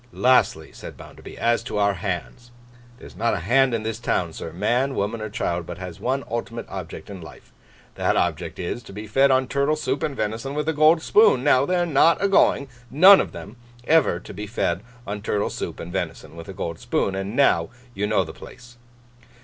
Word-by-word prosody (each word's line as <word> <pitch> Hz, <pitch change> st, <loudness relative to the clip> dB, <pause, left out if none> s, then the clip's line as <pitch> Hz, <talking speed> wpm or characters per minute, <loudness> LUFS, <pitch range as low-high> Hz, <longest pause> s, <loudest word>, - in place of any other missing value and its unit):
'Lastly,' 130 Hz, +1 st, +2 dB
said -, -, -10 dB
Bounderby, -, -, -12 dB
'as 115 Hz, 0 st, +1 dB
to 120 Hz, -2 st, -5 dB
our 100 Hz, 0 st, +2 dB
Hands. 100 Hz, +6 st, -5 dB, 0.5 s
There's -, -, -13 dB
not 115 Hz, +1 st, 0 dB
a 90 Hz, -, -4 dB
Hand 130 Hz, +6 st, +3 dB
in 110 Hz, -, -3 dB
this 110 Hz, 0 st, -4 dB
town, 90 Hz, -8 st, -1 dB
sir, 80 Hz, -, -7 dB
man, 120 Hz, +10 st, 0 dB
woman, 105 Hz, +3 st, -2 dB
or 110 Hz, -, -4 dB
child, 85 Hz, -4 st, -3 dB
but 85 Hz, -, -7 dB
has 90 Hz, -2 st, -8 dB
one 135 Hz, +3 st, -1 dB
ultimate 115 Hz, 0 st, -5 dB
object 90 Hz, -4 st, -8 dB
in 95 Hz, -3 st, -8 dB
life. 80 Hz, -, -14 dB, 0.4 s
That -, -, 0 dB
object -, -, -1 dB
is, 90 Hz, +7 st, -4 dB
to 100 Hz, -, -13 dB
be 105 Hz, +2 st, -7 dB
fed 135 Hz, +6 st, +3 dB
on 130 Hz, -1 st, +2 dB
turtle 140 Hz, +3 st, +1 dB
soup 140 Hz, -2 st, -2 dB
and 140 Hz, -, -2 dB
venison 115 Hz, +5 st, -3 dB
with 150 Hz, 0 st, -2 dB
a 160 Hz, -, +1 dB
gold 155 Hz, +2 st, +4 dB
spoon. 210 Hz, -, +4 dB
Now, 140 Hz, -1 st, +3 dB
they're 180 Hz, -1 st, +1 dB
not 165 Hz, +1 st, +4 dB
a 200 Hz, -, +2 dB
going—none 140 Hz, +2 st, +4 dB
of -, -, -6 dB
'em—ever 120 Hz, -, -1 dB
to -, -, -11 dB
be 105 Hz, +2 st, -6 dB
fed 90 Hz, -5 st, -1 dB, 0.2 s
on 105 Hz, +1 st, -5 dB
turtle 105 Hz, -1 st, -1 dB
soup -, -, -6 dB
and 85 Hz, +1 st, -8 dB
venison 85 Hz, -3 st, -5 dB
with 85 Hz, +4 st, -10 dB
a -, -, -6 dB
gold 85 Hz, -3 st, -5 dB
spoon. 95 Hz, -, -1 dB
And 95 Hz, +3 st, -4 dB
now 85 Hz, -12 st, +3 dB, 0.2 s
you 105 Hz, -1 st, -2 dB
know 105 Hz, -, +2 dB
the -, -, -9 dB
place. 120 Hz, -1 st, -14 dB
115 Hz, 205 wpm, -23 LUFS, 95-135 Hz, 0.5 s, gold